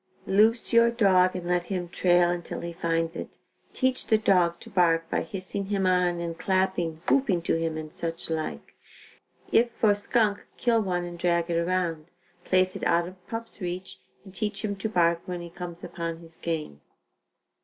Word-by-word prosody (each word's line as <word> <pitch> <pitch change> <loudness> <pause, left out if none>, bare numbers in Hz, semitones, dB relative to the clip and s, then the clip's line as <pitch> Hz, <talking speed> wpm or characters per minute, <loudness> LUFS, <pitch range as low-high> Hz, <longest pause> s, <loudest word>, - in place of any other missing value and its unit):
Loose 220 +5 +3
your 235 0 +6
dog 190 -6 +4
and 175 -1 -4
let 175 0 +2
him 180 -3 -2
trail 175 0 +3
until 175 -1 -4
he 170 0 -5
finds 165 -1 -1
it. - - -7 0.3
Teach 260 -1 0
the 220 - +5
dog 180 -5 +3
to - - -13
bark 165 -3 +3
by - - +1
hissing 190 +3 -4
him 195 -1 0
on 180 -1 +2
and 165 -1 -4
clapping, 185 -3 0
whooping 215 -12 +2
to - - +1
him 165 -1 -1
and 155 -1 -7
such 165 0 -4
like. 155 - -4 0.8
If 235 +1 +4
for 215 -2 +3
skunk, 205 0 +1
kill 230 -2 +2
one 180 -3 -1
and 175 0 -8
drag 170 0 +1
it 165 - +1
around, 170 -3 -1 0.4
place 185 0 +2
it - - -6
out 170 0 +2
of 185 0 -14
pup's 225 -1 -6
reach, 180 +1 -5 0.3
and 190 - -12
teach 210 +1 -3
him 205 -1 -2
to 220 +3 -3
bark 170 -4 +2
when 180 -1 -4
he 170 0 -9
comes 175 -1 -8
upon 165 -1 -4
his 165 -1 -14
game. 155 - -4
180 Hz, 185 wpm, -27 LUFS, 170-195 Hz, 0.8 s, your